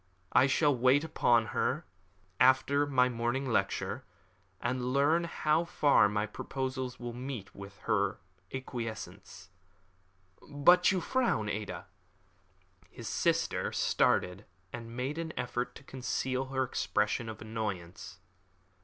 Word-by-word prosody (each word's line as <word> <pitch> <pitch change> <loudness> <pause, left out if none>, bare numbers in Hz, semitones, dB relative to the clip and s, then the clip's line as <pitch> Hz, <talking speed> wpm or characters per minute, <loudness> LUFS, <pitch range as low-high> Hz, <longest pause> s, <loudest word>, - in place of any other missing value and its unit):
I 130 - +5
shall 145 +1 +3
wait 130 +4 +4
upon 120 -7 +3
her - - 0 0.5
after 135 +3 +4
my 125 -3 +4
morning 120 +3 -1
lecture, 115 - -1 0.6
and 125 +1 -1
learn 155 +5 +3
how 155 -1 +1
far 145 -9 +4
my 105 +1 0
proposals 130 +3 -4
meet 120 -2 -6
with 100 0 -10
her 100 -2 +1 0.3
acquiescence. 110 -7 -7 1.0
But 175 +6 +5
you 185 -2 0
frown, 235 - 0
Ada!" 105 -3 -4 1.0
His - - -9
sister - - 0
started, 90 +3 +1 0.3
and 115 0 -7
made 135 +6 -2
an 160 -1 -4
effort 120 0 -3
to - - -12
conceal 130 0 -2
her 130 0 -1
expression 110 -1 -1
of 110 - -7
annoyance. 105 -7 -5
125 Hz, 115 wpm, -31 LUFS, 110-140 Hz, 1.0 s, I